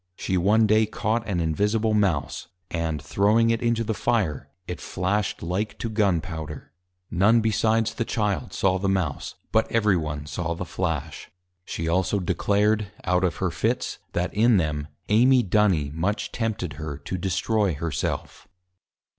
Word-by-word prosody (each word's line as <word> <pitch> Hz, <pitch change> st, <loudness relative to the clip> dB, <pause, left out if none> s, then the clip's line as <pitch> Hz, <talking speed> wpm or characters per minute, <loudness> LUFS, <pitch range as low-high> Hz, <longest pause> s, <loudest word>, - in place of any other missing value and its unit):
She 95 Hz, -, -2 dB
one 105 Hz, +5 st, +4 dB
Day 110 Hz, +1 st, +4 dB
caught 110 Hz, +2 st, -1 dB
an 95 Hz, -4 st, -1 dB
Invisible 105 Hz, +7 st, +1 dB
Mouse, 95 Hz, -9 st, 0 dB, 0.2 s
and 80 Hz, -3 st, -1 dB
throwing 110 Hz, +9 st, +2 dB
it 115 Hz, -, 0 dB
into 115 Hz, -1 st, +1 dB
the 110 Hz, -, -1 dB
Fire, 95 Hz, -, -1 dB, 0.2 s
it 90 Hz, -, -5 dB
Flash'd 100 Hz, +2 st, -1 dB
like 95 Hz, +5 st, -2 dB
to 115 Hz, -, -4 dB
Gun 100 Hz, -6 st, +2 dB
Powder. 80 Hz, -4 st, -7 dB, 0.4 s
None 105 Hz, +7 st, +4 dB
besides 110 Hz, 0 st, +1 dB
the 115 Hz, -, -1 dB
Child 105 Hz, -4 st, -1 dB
saw 95 Hz, -1 st, +1 dB
the 95 Hz, +1 st, 0 dB
Mouse, 90 Hz, -7 st, -1 dB, 0.2 s
but 110 Hz, 0 st, +2 dB
every 105 Hz, -4 st, +3 dB
one 75 Hz, -3 st, -3 dB
saw 85 Hz, +2 st, -3 dB
the 90 Hz, -, -5 dB
Flash. 80 Hz, -4 st, -3 dB, 0.4 s
She 80 Hz, -, -4 dB
also 95 Hz, +4 st, +1 dB
declared, 100 Hz, +3 st, +1 dB, 0.2 s
out 90 Hz, +1 st, +1 dB
of 90 Hz, -3 st, +1 dB
her -, -, -1 dB
Fits, -, -, -1 dB
that 90 Hz, +1 st, -1 dB
in 110 Hz, +1 st, +4 dB
them, 75 Hz, -3 st, -1 dB, 0.2 s
Amy 125 Hz, +4 st, +5 dB
Duny 90 Hz, -8 st, +2 dB
much 95 Hz, +7 st, -1 dB
tempted 100 Hz, -9 st, -3 dB
her 75 Hz, -2 st, -4 dB
to 75 Hz, +6 st, -5 dB
destroy 95 Hz, +1 st, 0 dB
her 80 Hz, +2 st, -3 dB
self. 75 Hz, -, -4 dB
95 Hz, 160 wpm, -25 LUFS, 85-110 Hz, 0.4 s, Amy